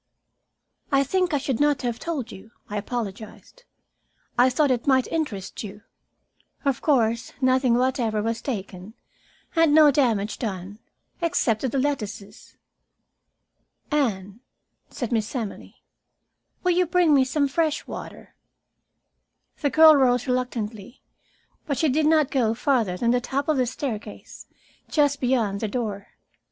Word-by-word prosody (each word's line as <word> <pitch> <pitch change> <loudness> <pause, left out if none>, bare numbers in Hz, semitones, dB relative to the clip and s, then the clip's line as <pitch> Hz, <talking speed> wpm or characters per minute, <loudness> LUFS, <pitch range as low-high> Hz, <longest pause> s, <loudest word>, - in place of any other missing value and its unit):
"I 275 0 +4
think 365 +5 0
I 295 - +2
should 270 -3 -2
not 290 -2 +2
have 240 -2 -2
told 285 -8 -4
you," 195 +4 -12 0.2
I 210 - -4
apologized. 220 - -6 0.7
"I 250 +1 +5
thought 280 +2 +2
it 245 0 -1
might 260 -2 +4
interest 260 - -3
you. 205 0 -9 0.8
Of 275 -3 0
course 235 -5 +1
nothing 255 -2 +3
whatever 240 -4 0
was 230 +1 -2
taken, 200 -4 -6 0.6
and 325 -2 +4
no 305 -2 +7
damage 225 -7 0
done 200 -2 -5 0.4
except 320 -10 +1
to 260 - -1
the 275 - -2
lettuces." 215 -7 -4 1.3
"Anne," 210 -8 -1 0.5
said 245 -5 -5
Miss 220 +1 -1
Emily, 225 -5 -6 0.8
"will 360 - +3
you 360 0 +2
bring 345 -2 +3
me 270 -2 +5
some 280 +2 0
fresh 310 +2 -1
water?" - - -9 1.3
The 290 - +1
girl 315 +2 +7
rose 250 -3 +3
reluctantly, 240 -4 -4 0.6
but 280 -3 -1
she 315 - +2
did 300 +3 +2
not 310 -3 +3
go 230 -4 +1
farther 230 -8 0
than 235 +4 +1
the 245 0 +2
top 275 +3 -2
of 310 -2 +2
the 255 -1 +1
staircase, 240 -4 -6 0.4
just 290 -2 +2
beyond 235 -6 +1
the 220 - -2
door. 210 -3 -4
255 Hz, 140 wpm, -24 LUFS, 220-290 Hz, 1.3 s, no